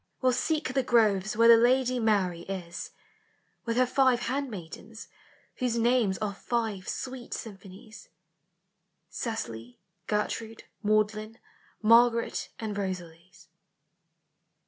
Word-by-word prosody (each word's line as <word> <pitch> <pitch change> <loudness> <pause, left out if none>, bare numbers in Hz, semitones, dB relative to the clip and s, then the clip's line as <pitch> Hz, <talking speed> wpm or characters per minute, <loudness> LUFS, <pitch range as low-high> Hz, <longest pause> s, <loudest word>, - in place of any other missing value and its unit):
will 255 -1 +2
seek 300 +1 -1
the 270 - +2
groves 215 -4 +2
Where 230 0 +6
the 235 - +10
lady 255 +2 +3
M 230 - -1
MYTHICAL: 210 -4 +4 0.2
LEGENDARY. 195 -1 -3
10L 175 - -6 0.8
With 230 0 -1
her 255 0 +4
rive 260 -2 +4
handmaidens, 225 -5 -5 0.5
whose 245 -2 0
names 230 -4 +2
Are 210 -2 -3
five 215 -2 -3
sweet 255 -2 -5
symphonies, 200 +1 -11 1.0
Cecily, 120 - -5 0.3
Gertrude, 220 +1 -2 0.2
Magdalen, 215 +1 0 0.5
Margaret 230 +1 +4
and 215 -2 -4
Rosalys. 180 -3 -6
225 Hz, 110 wpm, -28 LUFS, 200-240 Hz, 1.0 s, the